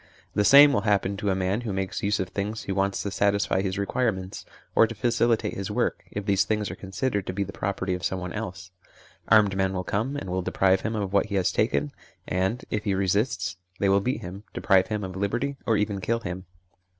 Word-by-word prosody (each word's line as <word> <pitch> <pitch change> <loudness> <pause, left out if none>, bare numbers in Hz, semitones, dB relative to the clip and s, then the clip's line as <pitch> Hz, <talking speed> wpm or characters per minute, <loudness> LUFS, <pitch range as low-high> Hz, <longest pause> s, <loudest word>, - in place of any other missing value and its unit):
The 105 - +2
same 140 +5 +8
will 105 - +2
happen 100 -2 +1
to 105 0 -1
a 95 - +2
man 95 +4 0
who 115 -4 -4
makes 95 -1 -3
use 105 +1 +1
of 95 -2 -2
things 105 +3 -3
he - - -4
wants 100 0 0
to 100 - -3
satisfy 100 -1 +1
his 95 -1 -2
requirements 100 -2 -2 0.3
or 115 - +5
to 115 - -7
facilitate 120 0 +1
his 95 -1 -4
work, - - -1
if 100 -1 -5
these 100 -1 +3
things 105 0 -1
are - - -6
considered 100 +2 -2
to 95 - -2
be 100 +2 -1
the 100 - -8
pro 100 - -1
perty 95 -1 -3
of 90 -1 -4
someone 90 -2 -2
else; 95 -4 -6 0.6
armed 105 -3 +5
men 95 0 +1
will 90 -1 -2
come, 115 +10 -2
and 95 -10 -5
will 95 0 0
deprive 95 +1 +2
him 115 0 -2
of 100 -2 -3
what 100 +1 +3
he 100 - -3
has 95 -2 +2
taken, 70 0 0 0.4
and, 95 +6 -1
if 105 - -1
he 100 -2 +1
resists, 95 +1 0 0.2
they 100 - +1
will 100 0 +4
beat 125 +6 -2
him, 95 +3 -8
deprive 95 -3 +3
him 105 -1 -2
of 95 -1 -6
liberty, 120 +9 -1
or 110 -2 +3
even 105 -1 -1
kill 115 +4 0
him. 90 -1 -5
100 Hz, 230 wpm, -26 LUFS, 95-105 Hz, 0.6 s, same